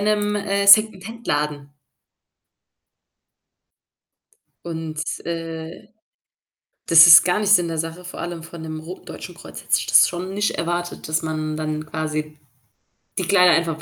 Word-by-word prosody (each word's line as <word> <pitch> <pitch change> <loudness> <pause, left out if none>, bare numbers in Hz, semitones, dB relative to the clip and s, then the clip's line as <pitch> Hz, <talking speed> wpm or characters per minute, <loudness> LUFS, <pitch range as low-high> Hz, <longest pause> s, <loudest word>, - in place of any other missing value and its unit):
'nem, 210 0 0
äh, 200 0 -2
Secondhandladen. 195 -9 +2 3.0
Und, 160 -2 -5 0.2
äh, 165 -1 -7 1.0
das 165 0 +8
ist 165 - +9
gar 180 +3 0
nicht 210 -1 0
Sinn 175 -4 +4
der 165 - -4
in 155 - +1
der 165 - -6
Sache, 180 +2 -14
vor 180 - -9
allem 170 -1 -6
von 165 0 -11
'nem 155 -1 -7
ro 170 +4 -10
Deutschen - - -10
Kreuz - - -11
hätte - - -7
ich - - -5
das - - +5
schon 185 +2 -6
nicht 205 +1 -1
erwartet, 175 0 -4
dass 155 +1 -1
man 155 -1 -4
dann 155 0 -4
quasi 155 -1 -5 0.8
die - - -2
Kleider 180 -2 +5
einfach 165 -1 -1
165 Hz, 150 wpm, -21 LUFS, 155-190 Hz, 3.0 s, ist